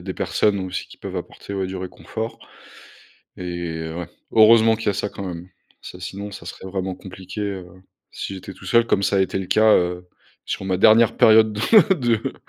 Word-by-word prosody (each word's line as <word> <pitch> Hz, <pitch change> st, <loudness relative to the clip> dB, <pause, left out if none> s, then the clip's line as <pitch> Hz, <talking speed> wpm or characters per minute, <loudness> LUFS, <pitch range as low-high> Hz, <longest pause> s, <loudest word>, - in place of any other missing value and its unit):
a -, -, -12 dB
des 95 Hz, +1 st, -5 dB
personnes 105 Hz, -2 st, +1 dB
aussi 95 Hz, 0 st, -4 dB
qui -, -, -14 dB
peuvent -, -, -7 dB
apporter, 100 Hz, -, -7 dB
ouais, 95 Hz, -1 st, -2 dB
du 95 Hz, -, -6 dB
réconfort 110 Hz, +4 st, -6 dB, 1.0 s
et 85 Hz, -3 st, -5 dB
ouais, 85 Hz, -1 st, -5 dB, 0.2 s
heureusement 110 Hz, 0 st, +6 dB
qu'il 110 Hz, -1 st, -6 dB
y -, -, +5 dB
a 100 Hz, -, 0 dB
ça 100 Hz, +1 st, -2 dB
quand 100 Hz, -, -8 dB
même. 90 Hz, -1 st, -7 dB, 0.3 s
Ça 90 Hz, -, -10 dB
sinon, 100 Hz, +3 st, -7 dB
ça -, -, -10 dB
serait 95 Hz, -, -8 dB
vraiment 95 Hz, -1 st, -3 dB
compliqué, 95 Hz, +2 st, -9 dB
heu, 95 Hz, -3 st, -4 dB, 0.4 s
si 100 Hz, -, -6 dB
j'étais 95 Hz, 0 st, -9 dB
tout 95 Hz, -, -15 dB
seul. 115 Hz, +5 st, +3 dB
Comme 100 Hz, -, +1 dB
ça 100 Hz, -, +2 dB
a -, -, +3 dB
été 95 Hz, -, -1 dB
le 95 Hz, -, -3 dB
cas, 110 Hz, 0 st, +5 dB
heu, 90 Hz, 0 st, -1 dB, 0.4 s
sur -, -, -4 dB
ma 95 Hz, -1 st, 0 dB
dernière 110 Hz, +3 st, +5 dB
période 110 Hz, -1 st, +6 dB
de 105 Hz, -, -4 dB, 0.4 s
de 120 Hz, -3 st, 0 dB
95 Hz, 205 wpm, -22 LUFS, 90-110 Hz, 1.0 s, heureusement